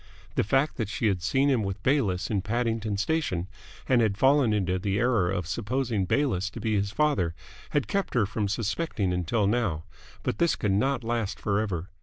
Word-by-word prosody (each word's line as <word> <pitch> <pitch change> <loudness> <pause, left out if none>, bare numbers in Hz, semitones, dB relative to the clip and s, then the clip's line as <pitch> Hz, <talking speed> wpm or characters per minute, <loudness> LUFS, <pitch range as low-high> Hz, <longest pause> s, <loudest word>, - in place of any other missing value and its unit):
The - - +1
fact 135 +8 +1
that 110 -4 -2
she 110 - -2
had 95 -4 +1
seen 135 +10 +2
him 130 -5 +3
with 100 0 -4
Bayliss 100 -10 +1
in 100 -3 +1
Paddington 110 -1 -1
Station 100 - -1 0.4
and 125 -2 +4
had 105 -3 +1
fallen 135 -1 +4
into 95 -3 0
the 100 +1 -1
error 115 -6 +2
of 95 -1 -2
supposing 115 +2 -1
Bayliss 100 -4 +1
to - - -8
be 110 -1 -1
his 100 -1 +1
father 100 - +1 0.3
had 145 -3 0
kept 200 -7 -1
her 115 -4 +4
from 105 +1 -2
suspecting 110 - -1
until 90 +5 0
now; 100 -7 0 0.4
but - - -2
this 170 - +3
could 105 - -1
not 125 +5 +1
last 115 -3 -2
forever. 100 -4 -1
105 Hz, 190 wpm, -27 LUFS, 95-125 Hz, 0.4 s, and